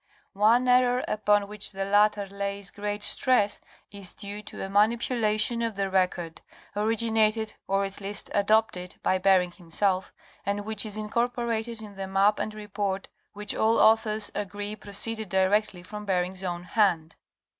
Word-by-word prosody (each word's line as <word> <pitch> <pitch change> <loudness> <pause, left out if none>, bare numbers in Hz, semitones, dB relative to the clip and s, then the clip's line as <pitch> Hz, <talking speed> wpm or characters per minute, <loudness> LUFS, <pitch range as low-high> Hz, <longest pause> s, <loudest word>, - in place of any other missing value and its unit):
One 225 +5 +3
error 250 0 +4
upon 205 -1 +2
which 210 0 -3
the 195 0 -3
latter 205 0 +3
lays 200 0 -5
great 205 0 -4
stress, 210 -3 +2 0.3
is 200 -3 -4
due 205 0 -7
to 210 - -7
a - - -5
manipu 220 +5 +2
lation 215 +2 +2
of 225 -2 -2
the 195 -1 -2
record, 180 -3 -1 0.3
originated 220 0 +1
or 195 0 +1
at 195 +1 -6
least 205 +1 -3
adopted 205 -3 +1
by 185 - +2
Bering 185 -2 +3
himself, 185 +2 -1 0.3
and 200 +1 -2
which 220 0 0
is 210 0 -4
incorporated 235 0 -2
in 205 -2 -11
the 195 0 -4
map 195 +2 +2
and 215 - -3
report 205 -2 -4 0.2
which 210 0 -3
all 225 +1 +2
authors 220 -1 +4
agree 205 +1 -4
proceeded 215 +1 0
directly 190 0 +1
from 210 +3 -8
Bering's 185 0 -1
own 175 -1 -3
hand. 175 -5 +1
205 Hz, 155 wpm, -27 LUFS, 195-220 Hz, 0.3 s, error